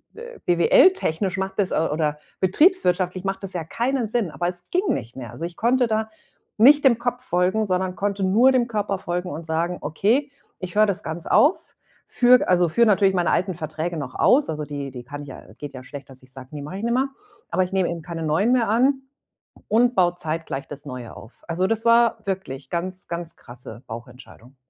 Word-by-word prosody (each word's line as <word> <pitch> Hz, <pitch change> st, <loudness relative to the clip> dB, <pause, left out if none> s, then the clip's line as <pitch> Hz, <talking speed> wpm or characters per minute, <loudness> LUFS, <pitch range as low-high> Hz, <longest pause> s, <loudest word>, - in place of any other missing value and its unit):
d 455 Hz, -, -10 dB
äh, 480 Hz, -1 st, -11 dB
BWL 175 Hz, -, +5 dB
technisch 190 Hz, -, -2 dB
macht 190 Hz, +2 st, -4 dB
das 190 Hz, -, +1 dB
oder 150 Hz, -1 st, 0 dB, 0.2 s
betriebswirtschaftlich 185 Hz, -, +2 dB
macht 195 Hz, 0 st, -3 dB
das 195 Hz, -, -5 dB
ja 175 Hz, -, -3 dB
keinen 240 Hz, -, -1 dB
Sinn, 220 Hz, -8 st, -1 dB
aber 175 Hz, -, -2 dB
es 175 Hz, 0 st, -6 dB
ging 370 Hz, +2 st, +1 dB
nicht 120 Hz, -1 st, -4 dB
mehr. 120 Hz, -4 st, -7 dB
Also, 160 Hz, +8 st, -5 dB
ich 170 Hz, -, -7 dB
konnte 245 Hz, +2 st, +2 dB
da 220 Hz, 0 st, -1 dB, 0.5 s
nicht 285 Hz, +5 st, +7 dB
dem 235 Hz, -4 st, +5 dB
Kopf 245 Hz, +1 st, -2 dB
folgen, 185 Hz, +1 st, +1 dB
sondern 185 Hz, -1 st, -1 dB
konnte 200 Hz, 0 st, -2 dB
nur 230 Hz, +8 st, +5 dB
dem 245 Hz, -2 st, +2 dB
Körper 210 Hz, -3 st, -2 dB
folgen 180 Hz, 0 st, -3 dB
und 160 Hz, +2 st, -6 dB
sagen: 165 Hz, +2 st, -1 dB
„Okay, 230 Hz, -, +1 dB, 0.3 s
ich 185 Hz, -1 st, -6 dB
höre 215 Hz, +1 st, +6 dB
das 200 Hz, +1 st, -2 dB
ganz 160 Hz, +1 st, -5 dB
auf, 305 Hz, +6 st, +3 dB, 0.3 s
führe 250 Hz, 0 st, +4 dB
also, 180 Hz, -1 st, +4 dB
führe 235 Hz, +9 st, +4 dB
natürlich 195 Hz, -1 st, +4 dB
meine 175 Hz, -1 st, +1 dB
alten 185 Hz, -1 st, 0 dB
Verträge 160 Hz, +2 st, -4 dB
noch 140 Hz, -4 st, -5 dB
aus,“ 280 Hz, +3 st, +3 dB
also 150 Hz, -1 st, -3 dB
die 140 Hz, -2 st, -6 dB
die 125 Hz, -1 st, -9 dB
kann 145 Hz, +3 st, -7 dB
ich 140 Hz, -, -11 dB
ja, -, -, -9 dB, 0.2 s
geht 145 Hz, -2 st, -7 dB
ja 130 Hz, -, -9 dB
schlecht, 140 Hz, -1 st, -10 dB
dass 130 Hz, -1 st, -14 dB
ich 130 Hz, -, -15 dB
sage: 130 Hz, -1 st, -11 dB
„Ne, 145 Hz, -, -6 dB
mache 150 Hz, +6 st, -7 dB
ich -, -, -7 dB
nimmer.“ 255 Hz, +4 st, +1 dB, 0.4 s
Aber 185 Hz, -, +2 dB
ich 180 Hz, -, -6 dB
nehme 190 Hz, -2 st, +1 dB
eben 170 Hz, -1 st, -4 dB
keine 165 Hz, -1 st, -6 dB
Neuen 165 Hz, +10 st, +2 dB
mehr 245 Hz, -3 st, +2 dB
an 265 Hz, +5 st, +2 dB, 0.7 s
und 240 Hz, +3 st, +3 dB
baue 175 Hz, -2 st, +3 dB
zeitgleich 155 Hz, -4 st, -4 dB
das 145 Hz, 0 st, -8 dB
Neue 125 Hz, -4 st, -8 dB
auf. 115 Hz, -, -14 dB
Also, 175 Hz, +2 st, 0 dB
das 225 Hz, +1 st, 0 dB
war 235 Hz, 0 st, +5 dB
wirklich 185 Hz, -9 st, -5 dB
ganz 185 Hz, +2 st, -4 dB
ganz 170 Hz, -1 st, -4 dB
krasse 120 Hz, -1 st, -10 dB
Bauchentscheidung. 120 Hz, +2 st, -11 dB
180 Hz, 210 wpm, -23 LUFS, 155-225 Hz, 0.7 s, nicht